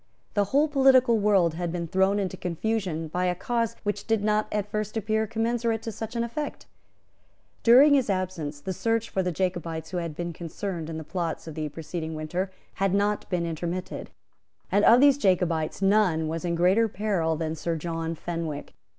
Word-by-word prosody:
The 205 -1 +2
whole 280 +9 +3
political 265 -5 +5
world 195 -5 +3
had 170 0 -3
been 170 -1 -3
thrown 190 +4 +2
into 195 -3 -2
confusion 180 -2 -2
by 180 +4 -1
a 180 0 +1
cause 230 +3 -1
which 205 -1 -3
did 220 -2 +1
not 210 0 +2
at 210 -1 -2
first 215 0 -2
appear 220 +1 0
commensurate 230 0 -1
to 225 - -4
such 225 +2 -6
an 235 - +1
effect. 260 +6 -5 1.0
During 265 +5 +7
his 265 -5 +3
absence, 180 -6 -2
the 190 - -3
search 225 +3 -1
for 190 - +1
the 180 -1 -1
Jacobites 165 -3 -3
who 180 - -2
had 170 -3 -3
been 170 +1 -4
concerned 170 0 -5
in 160 - -4
the 160 - -5
plots 170 0 -3
of 160 - -7
the 155 0 -3
preceding 160 +1 -5
winter 175 +5 -2 0.3
had 195 -1 +2
not 205 +1 0
been 175 -2 0
intermitted; 170 +2 -4 0.6
and 205 +1 +3
of 240 +2 +7
these 285 -1 +6
Jacobites 180 - +1
none 195 -6 +3
was 165 +2 -3
in 170 -1 0
greater 185 +7 +4
peril 190 -6 0
than 160 0 -2
Sir 165 +1 -2
John 165 0 -3
Fenwick. 165 -3 -5
185 Hz, 185 wpm, -26 LUFS, 165-220 Hz, 1.0 s, During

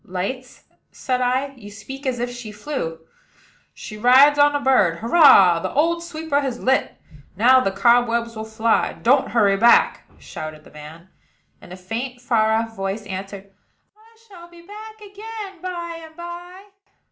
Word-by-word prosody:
"Lights?" 225 +8 -6 0.3
said 255 -2 -3
I, 255 +3 0
"you 210 -5 -12
speak 265 +7 -9
as 255 -1 -1
if 245 +1 -3
she 240 -3 -9
flew." 210 - -6 0.7
"She 215 - -10
rides 270 +5 +5
on 290 0 +4
a - - 0
bird. 255 -12 +2
Hurrah! 220 - +5
the - - -4
old 335 +4 0
sweeper 320 -3 -3
has 260 -4 -4
lit. 265 +1 0 0.4
Now 255 +5 +5
the 225 - 0
cobwebs 235 +3 +1
will 220 - -6
fly. 220 +1 0
Don't 265 +3 +1
hurry 205 -4 +2
back," 235 +3 +3
shouted 155 -1 -9
the - - -18
man; 155 +4 -13 0.5
and - - -15
a 180 - -9
faint, 235 +7 -6
far 225 -3 +1
off 225 0 -1
voice 195 +2 -4
answered, 195 0 -8 0.4
"I 450 +1 -24
shall 345 -4 -14
be 345 0 -17
back 430 +3 -12
again 410 -2 -10
by 345 -2 -6
and 320 0 -14
by." 350 +2 -10
245 Hz, 160 wpm, -21 LUFS, 210-320 Hz, 0.7 s, rides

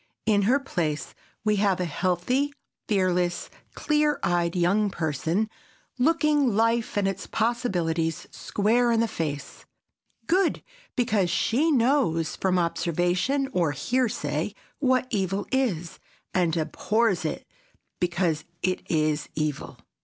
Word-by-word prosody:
In 210 -2 +3
her 270 +3 +4
place 160 - -3 0.3
we 210 -1 +2
have 195 -2 +2
a 180 - 0
healthy, 185 - 0 0.4
fearless, 180 -3 0 0.2
clear 300 -1 +1
eyed 175 0 +1
young 195 +4 +2
person, 165 +4 -1 0.5
looking 295 -4 +3
life 230 0 +1
and 200 -1 +2
its 195 - -3
possibilities 175 -9 -1
square 235 +4 +1
in 230 - +3
the 230 - +2
face, 150 -7 -5 0.6
good 370 +1 +2 0.3
because 220 -7 +1
she 255 - +2
knows 240 - +2
from 185 -1 +1
observation 175 - 0
or 170 -5 +1
hearsay 240 - -1 0.2
what 255 -2 +2
evil 195 -1 -1
is, 205 -11 -1 0.3
and 175 -2 +1
abhors 195 +5 +1
it 155 - -3 0.5
because 175 -3 0 0.2
it 185 0 0
is 155 -2 0
evil. 150 -2 -3
195 Hz, 115 wpm, -26 LUFS, 170-240 Hz, 0.6 s, her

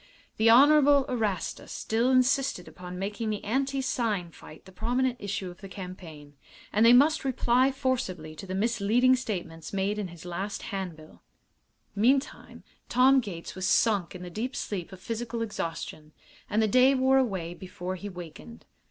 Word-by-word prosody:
The 220 +1 +4
Honorable 285 +2 +6
Erastus 215 -8 -3
still 230 +3 0
insisted 260 - +2
upon 180 0 -9
making 205 +4 -3
the 210 -1 -3
anti 270 +4 -1
sign 215 -9 -1
fight 155 - -14
the 190 - -14
prominent 245 +5 -1
issue 200 -2 -4
of 175 - -16
the 195 - -9
campaign, 175 -7 -10 0.4
and 215 - +3
they 230 - +8
must 290 +6 +5
reply 260 0 +2
forcibly 240 - -2
to 195 - -8
the 185 - -4
misleading 235 +4 +3
statements 175 -10 -5
made 200 +2 -1
in 205 - -3
his 170 -1 -12
last 190 +4 -4
hand 190 -4 -4
bill. 155 0 -16 0.7
Meantime 265 +7 0 0.3
Tom 260 +2 +5
Gates 190 -9 -6
was 185 0 -3
sunk 200 -4 +2
in 180 - -8
the 180 - -8
deep 240 +8 -4
sleep 190 -3 -4
of 190 - -10
physical 230 +3 -4
exhaustion, 165 -6 -5 0.4
and 220 +1 +2
the - - +3
day 255 +5 +5
wore 265 +1 +4
away 190 -9 -2
before 180 0 -6
he 205 +3 -7
wakened. 150 - -11
210 Hz, 165 wpm, -28 LUFS, 180-255 Hz, 0.7 s, they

